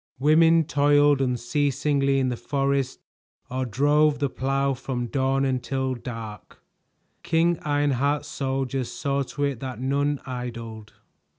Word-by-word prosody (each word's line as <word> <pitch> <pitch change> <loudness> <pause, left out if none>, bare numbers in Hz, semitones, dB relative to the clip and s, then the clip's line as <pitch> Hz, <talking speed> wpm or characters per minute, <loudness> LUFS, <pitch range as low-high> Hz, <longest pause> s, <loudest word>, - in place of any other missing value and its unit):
Women 160 +4 +5
toiled 145 -1 +3
unceasingly 140 +2 +1
in 130 -1 +1
the 125 - -2
forest 140 0 -1 0.5
or 130 0 -2
drove 145 +4 +3
the 140 -3 -1
plow 135 +1 0
from 130 -1 -4
dawn 135 +2 0
until 130 0 -1
dark; 115 -4 -8 0.6
King 165 0 +1
Ironheart's 145 0 0
soldiers 135 -2 -2
saw 140 0 -1
to 145 +2 -4
it 140 -4 -1
that 130 -3 -6
none 140 +2 0
idled. 115 -4 -7
135 Hz, 120 wpm, -25 LUFS, 130-145 Hz, 0.6 s, Women